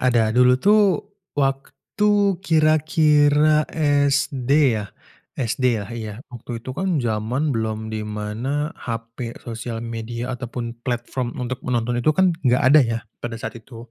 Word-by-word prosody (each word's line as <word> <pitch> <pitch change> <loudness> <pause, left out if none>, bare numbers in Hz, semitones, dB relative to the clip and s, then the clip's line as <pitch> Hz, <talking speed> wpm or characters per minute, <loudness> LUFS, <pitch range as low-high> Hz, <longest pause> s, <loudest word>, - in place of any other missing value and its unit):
ada, 115 -4 +2
dulu 125 +1 +5
tuh 210 +10 +4 0.6
waktu, 195 +8 0
kira-kira 155 -2 +3 0.4
SD 135 -2 -1 0.3
ya 105 - -6 0.5
SD 130 +1 -2
ya, 100 - -5
iya 110 -3 -5 0.2
waktu 120 -1 -7
itu 130 - -6
kan 185 -2 0
zaman 120 +6 -1
belum 110 -1 -3
dimana 110 +7 -3
HP, 115 +1 -6
sosial 115 -1 -5
media 115 +2 -5
ataupun 120 -2 -5
platform 120 0 -3
untuk 125 +1 -3
menonton 120 0 0
itu 155 - +3
kan 190 -1 +4 0.2
enggak 125 0 +3
ada 145 +3 +7
ya 115 -2 -1 0.2
pada 120 -1 -4
saat 115 0 -6
itu. 115 0 -13
125 Hz, 135 wpm, -22 LUFS, 115-145 Hz, 0.6 s, ada